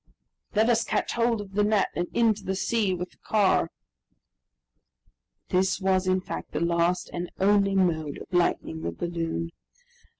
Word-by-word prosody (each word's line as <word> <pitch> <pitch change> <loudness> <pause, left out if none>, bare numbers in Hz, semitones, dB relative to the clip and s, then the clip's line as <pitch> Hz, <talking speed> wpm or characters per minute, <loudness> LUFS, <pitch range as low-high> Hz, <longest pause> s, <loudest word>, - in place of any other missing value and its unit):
"Let 220 +2 +4
us 235 -1 +3
catch - - -1
hold 230 -2 +1
of 195 -1 -11
the 210 +1 +2
net, 210 -1 +2
and 175 - -1
into 220 -3 +2
the 190 - -2
sea 210 0 +1
with 180 0 -5
the - - -26
car." 200 -5 +2 1.8
This 185 +1 +1
was, 190 -1 +1
in 185 0 +2
fact, - - -7
the - - -1
last 170 +1 +1
and 175 0 -4
only 200 0 +3
mode 160 -6 +1
of - - -9
lightening 170 - 0
the 85 +1 -2
balloon. 165 - -3
185 Hz, 160 wpm, -26 LUFS, 170-205 Hz, 1.8 s, Let